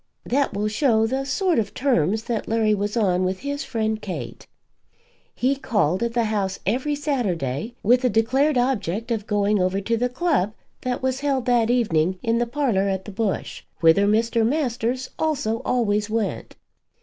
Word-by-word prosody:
That 275 -4 0
will 210 +1 0
show 220 0 +2
the 265 +4 -1
sort 360 - +1
of 215 - -3
terms 220 - +1
that 230 -2 -3
Larry 220 -1 +2
was 205 +2 -2
on 185 -4 +2
with 185 +1 -2
his 285 +2 -3
friend 220 -2 -2
Kate. 190 - -6 0.9
He 260 +3 +1
called 200 - 0
at 235 0 -1
the 235 - +3
house 205 -3 -1
every 260 +8 0
Saturday 220 - -2
with 245 +4 +4
the 255 - +2
declared 255 +6 +2
object 230 -3 -1
of 220 -2 -2
going 205 -1 +1
over 185 +2 +1
to 230 +4 -1
the 245 +2 0
club 250 - 0 0.3
that 255 0 -3
was 260 0 0
held 275 -3 0
that 240 -3 +2
evening 185 -8 +2
in 230 0 +1
the 240 - 0
parlour 235 -7 0
at 190 -1 -2
the 210 - -7
Bush, 205 -1 -3 0.2
whither 165 +5 +5
Mr. 225 +2 +2
Masters 255 -1 -1
also 265 -8 0
always 210 -4 +1
went. 220 -2 -2
225 Hz, 175 wpm, -23 LUFS, 205-255 Hz, 0.9 s, whither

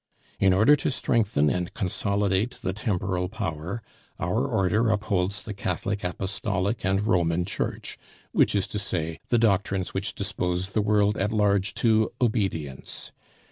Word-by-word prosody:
In 95 - +5
order 110 +10 +6
to 145 - -1
strengthen 110 - +1
and 90 -1 -3
consolidate 100 +2 0
the 95 -2 -1
temporal 95 -3 -1
power, 90 +2 -4 0.4
our - - 0
Order 105 +5 +2
upholds 100 -2 0
the 105 - -5
Catholic 100 +2 -2
Apostolic 95 +3 -2
and 95 +2 +1
Roman 85 -3 +2
Church, 100 - -4 0.3
which - - +3
is 100 -2 +2
to 105 - -2
say, 80 -6 -2
the 120 - +4
doctrines 100 -4 +1
which 95 +1 -2
dispose 90 +2 -2
the 110 - +2
world 105 0 +2
at 105 +2 0
large 100 -2 +2
to 110 -2 +3
obedience. 95 - -2
100 Hz, 140 wpm, -26 LUFS, 90-105 Hz, 0.4 s, order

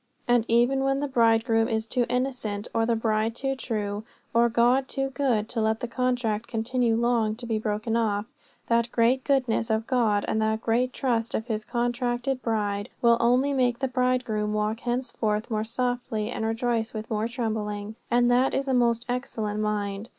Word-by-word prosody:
And 240 -2 +3
even 245 +4 +3
when 270 0 +1
the 290 - -1
bridegroom 225 -2 +3
is 220 -1 -1
too 245 +1 0
innocent, 250 -5 -2
or 225 0 +1
the 235 - +2
bride 220 0 0
too 270 +1 -1
true, 210 -5 -3 0.3
or 235 +1 +4
God 245 +3 +3
too 270 -1 -2
good 250 -7 0
to 230 - -2
let 220 0 +1
the 245 - -3
contract 235 -3 -1
continue 235 0 0
long 230 -2 +1
to 240 +2 -9
be 225 -2 -1
broken 215 +1 -2
off, 210 -3 0 0.4
that 235 0 +1
great 245 +3 +2
goodness 255 -4 +1
of 220 0 0
God 230 -6 +1
and 220 - 0
that 220 0 +1
great 245 +3 +1
trust 235 -3 -1
of 220 - -2
his 220 -3 -3
contracted 245 +2 -1
bride 205 -3 -1
will 235 -1 +6
only 250 +4 +3
make 250 -3 +2
the 265 - -1
bridegroom 250 -5 0
walk 215 +1 -1
henceforth 235 -3 -2
more 215 -1 0
softly 240 -1 -2
and 220 - -2
rejoice 225 0 -1
with 215 +1 -6
more 215 +1 0
trembling. 215 -3 -3 0.2
And 240 0 +3
that 250 +2 +3
is 275 0 -1
a 265 - +1
most 240 -1 +2
excellent 225 -4 -3
mind. 210 0 -2
235 Hz, 180 wpm, -26 LUFS, 220-250 Hz, 0.4 s, will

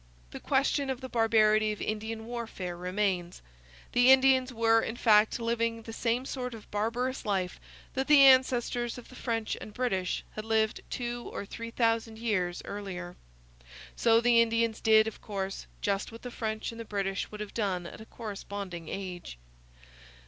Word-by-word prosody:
The - - -7
question 275 0 +1
of 260 -2 -2
the 260 -1 -7
barbarity 215 -2 +3
of 210 - -10
Indian 220 +1 -4
warfare 225 -7 -5
remains. 180 -1 -2 0.5
The 245 +1 +6
Indians 265 -1 +5
were 225 -1 +3
in 225 - -4
fact 220 -1 +4
living 230 -1 -1
the 225 - -8
same 240 +3 0
sort 250 -3 -4
of 220 - -14
barbarous 235 +5 -1
life 190 -3 -1 0.3
that 265 +1 -1
the 295 -2 +7
ancestors 250 -2 +4
of 245 - -11
the 255 - -13
French 225 -3 -2
and 210 - -9
British 190 -8 -1
had 215 - -6
lived 220 -1 +1
two 240 -1 -4
or - - -5
three 230 +3 -7
thousand 225 -1 0
years 185 -6 -1
earlier. 180 -3 -6 0.8
So 230 -1 +4
the 235 0 +5
Indians 230 -1 +1
did, 220 -1 +6
of 220 - -6
course, 195 -2 -4
just 200 +1 -1
what 230 - -11
the 245 - -6
French 220 -1 -3
and 230 0 -8
the - - -5
British 195 -2 -2
would 210 - -9
have 210 -1 -6
done 190 -5 -1
at 170 - -9
a 220 - -11
corresponding 200 -6 -7
age. 180 - -6
225 Hz, 170 wpm, -29 LUFS, 205-240 Hz, 0.8 s, the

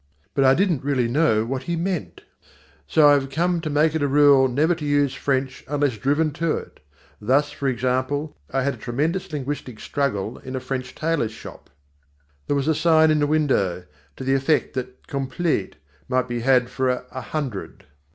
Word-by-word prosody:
But 135 - +2
I 130 0 +6
didn't 175 -6 +1
really 135 -4 +1
know 120 -4 +2
what 130 +2 -3
he 170 - +1
meant. 175 0 -3 0.7
So 155 -2 +5
I 145 - +7
have 135 -1 +1
come 170 +4 0
to 160 - -3
make 150 +1 +2
it 160 - -1
a 145 - +2
rule 140 -1 +5
never 150 +7 +2
to 165 -2 -7
use 145 -2 +2
French 135 -1 -2
unless 145 -5 0
driven 145 +6 +1
to 165 -2 +1
it. - - -10 0.4
Thus, 135 +7 +2
for 140 -3 -3
example, 130 +4 -1
I 135 +9 0
had 140 +1 0
a - - -11
tremendous 165 +10 -2
linguistic 135 -5 -5
struggle 125 -6 -2
in 130 0 -7
a - - -1
French 130 0 -5
tailors 155 -9 -1
shop. - - -12 0.8
There 145 - +1
was 140 +1 -1
a 160 - +4
sign 160 0 +4
in 155 - +2
the 145 - +2
window 130 - +1 0.3
to - - -7
the 135 +1 +1
effect 135 +3 +1
that 130 -1 -6
"completes" 140 - -2 0.3
might 130 -1 +1
be 120 -1 -3
had 125 0 +2
"for 130 0 0
a 125 +1 -4
hundred." 130 -5 -5
140 Hz, 190 wpm, -23 LUFS, 130-155 Hz, 0.8 s, I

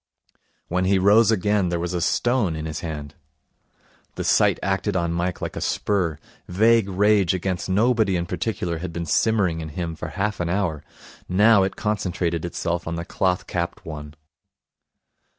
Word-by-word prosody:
When 90 +1 0
he 95 +1 +3
rose 100 +4 +5
again 105 -3 +2
there 85 -1 -1
was 85 +1 -3
a 90 - -1
stone 120 -4 +1
in 80 0 -5
his 80 -1 -4
hand. 75 -3 -6 1.0
The - - -3
sight - - +3
acted 95 +1 -1
on 85 -2 0
Mike 85 +1 -2
like - - -4
a - - -4
spur. 90 -7 0 0.3
Vague 110 +2 +3
rage 100 -1 +3
against 90 0 -3
nobody 110 0 +2
in 85 -1 -1
particular 90 -2 -3
had 90 0 -5
been 85 0 -3
simmering 95 -4 +1
in 80 - -6
him 85 0 -4
for - - -6
half 105 +2 -2
an 85 -1 -1
hour. 85 -5 -1 0.5
Now 105 +3 +5
it 95 0 -1
concentrated 90 -5 -2
itself 85 0 -3
on 85 - -2
the 85 0 -4
cloth 90 0 0
capped 85 -1 -4
one. 75 -1 -8
90 Hz, 170 wpm, -23 LUFS, 85-100 Hz, 1.0 s, rose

